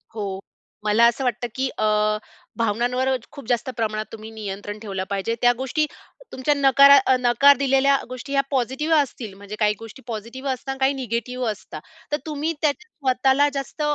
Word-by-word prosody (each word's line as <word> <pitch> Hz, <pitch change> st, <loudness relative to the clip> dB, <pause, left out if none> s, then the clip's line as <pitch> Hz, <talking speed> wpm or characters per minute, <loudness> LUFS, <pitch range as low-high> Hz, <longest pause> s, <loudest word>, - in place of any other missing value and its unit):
हो. 195 Hz, -3 st, -4 dB, 0.4 s
मला 215 Hz, +2 st, +4 dB
असं 240 Hz, +3 st, 0 dB
वाटतं, 245 Hz, -1 st, -1 dB
की 265 Hz, 0 st, 0 dB
अ, -, -, +1 dB, 0.7 s
भावनांवर 240 Hz, +4 st, 0 dB, 0.2 s
खूप 280 Hz, -6 st, -11 dB
जास्त 240 Hz, +1 st, 0 dB
प्रमाणात 215 Hz, -1 st, -1 dB
तुम्ही 220 Hz, 0 st, -9 dB
नियंत्रण 205 Hz, -1 st, -6 dB
ठेवलं 195 Hz, -3 st, -4 dB
पाहिजे. 200 Hz, +4 st, -1 dB
त्या 245 Hz, 0 st, +6 dB
गोष्टी 265 Hz, +4 st, 0 dB, 0.5 s
तुमच्या 260 Hz, +3 st, +1 dB
नकारा 280 Hz, 0 st, +7 dB
अ, 260 Hz, -, +5 dB
नकार 250 Hz, +3 st, +5 dB
दिलेल्या 275 Hz, 0 st, +3 dB
गोष्टी 255 Hz, +2 st, -7 dB
ह्या 275 Hz, -, +4 dB
पॉझिटिव्ह 265 Hz, +5 st, +1 dB
असतील, 250 Hz, -7 st, -2 dB
म्हणजे 200 Hz, +2 st, -9 dB
काही 210 Hz, -1 st, +3 dB
गोष्टी 225 Hz, +4 st, -11 dB
पॉझिटिव्ह 235 Hz, +5 st, -5 dB
असतात 260 Hz, +1 st, -6 dB
आणि 270 Hz, -, -5 dB
काही 265 Hz, +1 st, +3 dB
निगेटिव्ह 250 Hz, 0 st, -3 dB
असतात. 210 Hz, -, -9 dB, 0.3 s
तर 295 Hz, -, +2 dB
तुम्ही 310 Hz, +1 st, -2 dB
त्यात 295 Hz, -2 st, +3 dB
स्वतःला 270 Hz, -3 st, +2 dB
जास्त 275 Hz, +2 st, -5 dB
250 Hz, 170 wpm, -23 LUFS, 220-275 Hz, 0.7 s, नकारा